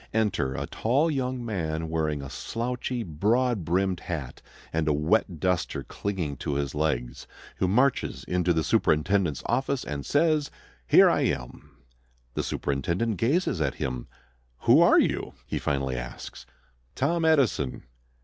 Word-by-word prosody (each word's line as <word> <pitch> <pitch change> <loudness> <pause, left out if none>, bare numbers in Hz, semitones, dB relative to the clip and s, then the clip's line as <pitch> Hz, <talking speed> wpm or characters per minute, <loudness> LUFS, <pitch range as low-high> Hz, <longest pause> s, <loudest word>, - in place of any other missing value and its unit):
Enter 100 -12 +1
a - - -3
tall 140 +8 +1
young 130 -3 -2
man 80 -7 -2
wearing 80 -3 -1
a 65 - -7
slouchy, 120 +1 -3
broad 110 +6 +1
brimmed 90 +2 0
hat 75 -8 -6 0.3
and 80 -1 0
a 75 - +3
wet 80 +3 +1
duster 90 +1 0
clinging 90 -9 -4
to 70 - -3
his 70 -1 -2
legs, 65 -5 -2 0.3
who 95 - +1
marches 125 +8 +1
into 90 -1 0
the 80 -2 +1
superintendent's 85 +1 +1
office, 130 +2 0
and 70 -1 -4
says: 150 -1 +2 0.4
"Here - - +7
I - - +3
am." 60 0 -4 0.6
The - - -1
superintendent 85 - -1
gazes 130 - +1
at 70 -3 0
him. 65 -2 -4 0.5
"Who - - +6
are - - +6
you?" - - 0
he - - -3
finally 70 -3 -1
asks. - - -8 0.5
"Tom 165 +6 +1
Edison." 135 - +2
90 Hz, 140 wpm, -27 LUFS, 75-120 Hz, 0.6 s, Here